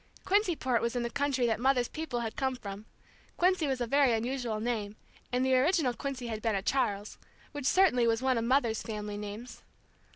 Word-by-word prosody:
Quincyport 340 Hz, -, +2 dB
was 235 Hz, +1 st, -1 dB
in 245 Hz, -, 0 dB
the 235 Hz, -, -3 dB
county 280 Hz, -3 st, 0 dB
that 225 Hz, -2 st, +1 dB
Mother's 250 Hz, -1 st, +2 dB
people 310 Hz, -7 st, -4 dB
had 225 Hz, -1 st, -4 dB
come 265 Hz, -1 st, -1 dB
from; 205 Hz, -3 st, -8 dB, 0.5 s
Quincy 360 Hz, -3 st, +2 dB
was 265 Hz, -2 st, -1 dB
a 240 Hz, -, 0 dB
very 275 Hz, 0 st, +3 dB
unusual 235 Hz, -1 st, -2 dB
name, 215 Hz, -3 st, -2 dB, 0.4 s
and 250 Hz, +1 st, +1 dB
the 260 Hz, 0 st, +3 dB
original 280 Hz, -1 st, +3 dB
Quincy 265 Hz, -1 st, -5 dB
had 220 Hz, -2 st, -4 dB
been 225 Hz, -2 st, 0 dB
a 195 Hz, -, -2 dB
Charles, 210 Hz, -6 st, -1 dB, 0.3 s
which 290 Hz, -3 st, -3 dB
certainly 285 Hz, -11 st, +4 dB
was 225 Hz, -1 st, +2 dB
one 260 Hz, 0 st, +1 dB
of -, -, -2 dB
Mother's 235 Hz, -3 st, +2 dB
family 210 Hz, -2 st, -5 dB
names. 210 Hz, +4 st, -7 dB
245 Hz, 195 wpm, -30 LUFS, 225-270 Hz, 0.5 s, certainly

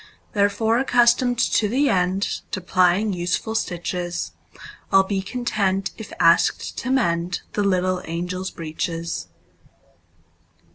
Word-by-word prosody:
Therefore, 220 Hz, +2 st, +2 dB
accustomed 245 Hz, -1 st, +3 dB
to 225 Hz, -2 st, +2 dB
the 270 Hz, +6 st, +2 dB
endTo 190 Hz, -2 st, -1 dB
plying 185 Hz, +3 st, +3 dB
useful 180 Hz, +5 st, -2 dB
stitches,I 175 Hz, -4 st, -5 dB
'll 195 Hz, -, +6 dB
be 195 Hz, 0 st, -2 dB
content 195 Hz, -3 st, -1 dB
if 220 Hz, -, -9 dB
asked 165 Hz, 0 st, +3 dB
to 255 Hz, -, -4 dB
mendThe 180 Hz, -5 st, 0 dB
little 185 Hz, -2 st, +1 dB
angels' 180 Hz, +3 st, -3 dB
breeches. 165 Hz, -, -4 dB
190 Hz, 100 wpm, -22 LUFS, 180-220 Hz, -, ll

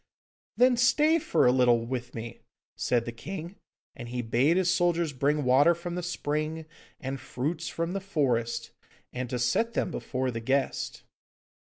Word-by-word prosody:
'Then 250 Hz, 0 st, +5 dB
stay 300 Hz, +6 st, +4 dB
for -, -, +2 dB
a 125 Hz, -, +6 dB
little 120 Hz, -2 st, +3 dB
with 125 Hz, 0 st, -5 dB
me,' 115 Hz, -1 st, -7 dB, 0.3 s
said 120 Hz, -2 st, 0 dB
the 120 Hz, -, -4 dB
king, 175 Hz, -, -7 dB, 0.4 s
and 120 Hz, -4 st, -8 dB
he 125 Hz, 0 st, -3 dB
bade 130 Hz, +9 st, +2 dB
his 180 Hz, -1 st, +3 dB
soldiers 170 Hz, -3 st, +1 dB
bring 145 Hz, +3 st, +1 dB
water 135 Hz, +7 st, +5 dB
from 170 Hz, +1 st, -6 dB
the 180 Hz, -, -2 dB
spring 155 Hz, -2 st, -3 dB, 0.3 s
and 135 Hz, +1 st, -4 dB
fruits 155 Hz, +6 st, -3 dB
from 165 Hz, +2 st, -3 dB
the 195 Hz, -, -2 dB
forest, 130 Hz, -11 st, -1 dB, 0.4 s
and 125 Hz, -1 st, -4 dB
to 125 Hz, -, -2 dB
set 120 Hz, -, +1 dB
them -, -, 0 dB
before 130 Hz, -4 st, -2 dB
the 115 Hz, -, -4 dB
guest. 135 Hz, +4 st, -1 dB
145 Hz, 165 wpm, -28 LUFS, 125-175 Hz, 0.4 s, a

